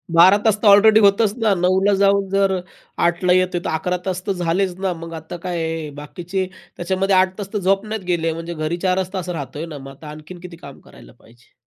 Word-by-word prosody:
12 185 +4 +7
तास 220 - +4
तर 215 - +2
ऑलरेडी 215 +2 +7
होतंच 200 +1 +4
ना. 220 -4 +2
9:00ला 190 +3 +2
जाऊन 200 0 +3
जर 195 0 +2 0.5
8:00ला 175 +1 +1
येत 185 0 +2
आहे, 175 - -2
तर - - -1
11 180 +3 -1
तास 185 -1 -3
तर - - +1
झालेच 180 +1 -1
ना. 190 -1 -1
मग 165 0 -9
आता 160 +2 -8
काय 165 -3 -3
बाकीचे 180 +5 -4 0.3
त्याच्यामध्ये 190 +2 0
8 185 0 +2
तास 200 +1 -7
तर 210 - 0
झोपण्यात 195 +3 0
गेले. 165 -1 0
म्हणजे 165 +1 -6
घरी 155 +2 -3
4च 185 +1 -1
तास 180 -2 -4
राहत 140 -6 -5
आहे 160 - -4
ना, 155 -3 -8
मग 135 0 -10
आता 155 - -13
आणखीन 155 +4 -10
किती 180 -1 -10
काम 140 -4 -12
करायला - - -16
पाहिजे? 120 +1 -23
180 Hz, 215 wpm, -20 LUFS, 165-195 Hz, 0.5 s, 12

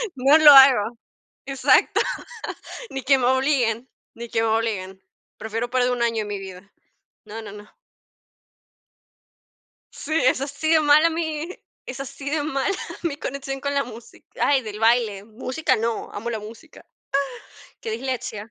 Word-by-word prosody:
No 275 +4 +5
lo 305 -2 +9
hago 250 -5 +7 0.5
exacto. 270 -1 +3 0.9
Ni 270 -1 -5
que 270 +1 +4
me 245 - 0
obliguen, 260 -3 +1 0.3
ni 235 0 -8
que 225 - 0
me 225 - +1
obliguen. 200 -4 -2 0.4
Prefiero 225 +2 -4
perder 250 -1 +1
1 240 -1 -2
año, 230 -2 0
mi 205 -1 -4
vida. 190 0 -11 0.5
No, 220 +2 -8
no, 205 -2 -9
no. 210 0 -12 2.3
Sí, 310 - -9
es 260 +1 +3
así 285 +3 -2
de 320 - +6
mala 305 +2 +5
mi 320 -1 -3 0.4
es 255 +1 -7
así 275 +1 -6
de 305 -1 0
mala 305 +6 -1 0.3
mi 320 -5 -1
conexión 270 -1 -5
con 280 0 -2
la 280 - +2
músic 235 -1 -13 0.2
ay, 280 -2 +3
del 210 -1 -7
baile. 225 -3 +2
Música 255 +5 -2
no, 230 0 -3
amo 225 +4 -5
la 220 - -3
música. 225 +9 -13 0.8
Ay, - - -21
qué 450 - -4
dislexia. 245 - -4
250 Hz, 150 wpm, -23 LUFS, 220-280 Hz, 2.3 s, lo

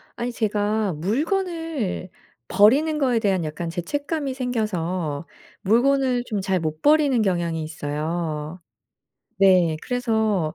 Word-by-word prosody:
아니 240 +1 -3
제가 210 -2 0
물건을 300 - -2 0.4
버리는 285 +10 +4
거에 255 -5 +2
대한 195 -5 +1
약간 155 +2 -4
죄책감이 285 - -3
생겨서 185 - -2 0.3
물건을 250 +3 +2
좀 215 -4 -2
잘 190 -1 0
못 155 -1 -4
버리는 295 -4 +4
경향이 175 -4 0
있어요. 155 +1 -4 0.8
네. 185 -5 +5
그래서 220 -9 0
205 Hz, 240 characters per minute, -23 LUFS, 170-255 Hz, 0.8 s, 네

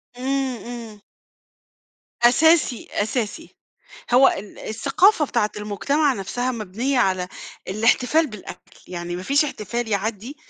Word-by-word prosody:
إمم، 265 +1 -1
إمم. 230 -3 -8 1.2
أساسي، 315 0 +4
أساسي. 230 +8 -3 0.6
هو 265 +2 +7
ال 200 +1 -5
الثقافة 300 - +2
بتاعة 235 -5 0
المُجتمع 270 +8 0
نفسها 245 +5 -2
مبنية 235 +5 -2
على 185 -4 +1 0.4
الاحتفال 250 +10 +2
بالأكل، 215 -8 -11
يعني 175 -1 -5
ما 180 - -6
فيش 280 +8 +3
احتفال 235 -3 -4
يعدّي 220 +6 -3
240 Hz, 110 wpm, -22 LUFS, 210-275 Hz, 1.2 s, هو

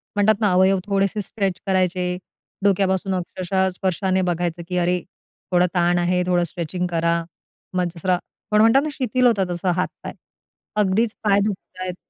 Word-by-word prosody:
म्हणतात 205 +1 +3
ना, 210 -3 +3
अवयव 190 +1 +4
थोडेसे 200 0 0
स्ट्रेच 195 -2 -2
करायचे. 180 -1 +1 0.5
डोक्यापासून 195 -1 +2
अक्षरशः 185 +1 -1
स्पर्शाने 190 0 0
बघायचं, 175 0 -2
की 180 0 -2
अरे, 180 +1 +2 0.5
थोडा 180 0 +4
ताण 175 0 +3
आहे. 180 +1 +1
थोडं 175 -1 +2
स्ट्रेचिंग 175 +2 -3
करा, 170 0 +1 0.5
मग 180 -1 +1
जसं 170 +2 -8
रा 180 - +4 0.3
पण 210 0 +5
म्हणतात 230 +5 +6
ना, 305 - -2
शिथिल 255 -1 +2
होतात 205 -5 +2
तसे 175 +1 -1
हातपाय. 185 - -4 0.6
अगदीच 210 +2 +2
पाय 200 -2 +4
दुखतायत. 185 -3 -5
185 Hz, 155 wpm, -22 LUFS, 180-200 Hz, 0.6 s, म्हणतात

